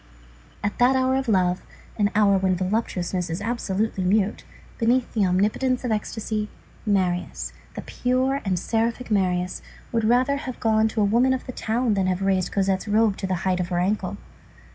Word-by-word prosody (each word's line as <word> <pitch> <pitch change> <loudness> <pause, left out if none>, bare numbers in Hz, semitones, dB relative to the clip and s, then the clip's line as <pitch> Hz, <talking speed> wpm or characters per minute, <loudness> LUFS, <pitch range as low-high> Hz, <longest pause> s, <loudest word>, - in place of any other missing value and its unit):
At 205 - -2
that 250 +2 +5
hour 260 0 +2
of 265 -1 -1
love, 185 -4 +2 0.3
an 205 -2 +2
hour 205 -2 +5
when 185 -1 +1
voluptuousness 185 -2 -1
is 165 +2 -3
absolutely 210 -2 -1
mute, 200 +3 +1 0.4
beneath 240 +2 +1
the 205 -4 +2
omnipotence 215 +8 +1
of 245 - -1
ecstasy, 215 0 -2 0.4
Marius, 185 -3 0 0.2
the - - -6
pure 260 +2 0
and 190 -3 0
seraphic 230 +5 -1
Marius, 180 -3 0 0.3
would 230 -1 0
rather 255 +5 +3
have 255 -3 -6
gone 220 -1 +3
to 220 0 -1
a - - +4
woman 240 +6 +3
of 260 - -3
the 255 - -5
town 235 0 0
than 195 -2 +1
have 185 +1 -1
raised 190 -2 +1
Cosette's 195 0 0
robe 215 0 +3
to 190 - -3
the 185 - 0
height 185 -1 +1
of 180 - -1
her 175 -1 -2
ankle. 195 +4 -1
210 Hz, 180 wpm, -24 LUFS, 190-235 Hz, 0.4 s, that